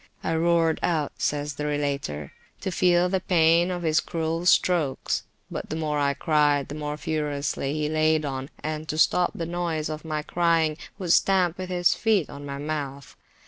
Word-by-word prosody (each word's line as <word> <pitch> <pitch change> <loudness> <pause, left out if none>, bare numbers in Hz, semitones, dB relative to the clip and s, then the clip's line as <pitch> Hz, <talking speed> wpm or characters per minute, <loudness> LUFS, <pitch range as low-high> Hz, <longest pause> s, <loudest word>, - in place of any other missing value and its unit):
I 165 - 0
roared 165 -1 +2
out, 155 -4 0
says 145 0 -1
the 150 +1 -4
relator, 140 - -2 0.3
to 190 - -2
feel 180 0 +3
the 190 +1 0
pain 170 -1 +3
of 175 -1 -3
his 155 -1 +3
cruel 165 +1 -2
strokes, 165 -8 +2 0.3
but - - -5
the - - -3
more 150 -2 -1
I 140 -1 +1
cried, 145 -2 +2
the - - -5
more 150 0 -4
furiously 145 -2 -2
he 150 -1 0
laid 155 0 +2
on, 135 0 -4
and 155 0 -4
to 155 - -2
stop 175 +2 +3
the 165 - -3
noise 170 -2 -2
of 155 0 -5
my 155 -2 -3
crying, 165 -2 +1 0.2
would 180 -4 +1
stamp 185 -3 +3
with 185 0 -5
his 175 -1 +3
feet 215 -8 +1
on 145 0 -8
my 140 0 -5
mouth. 140 -2 -5
155 Hz, 185 wpm, -25 LUFS, 145-170 Hz, 0.3 s, feel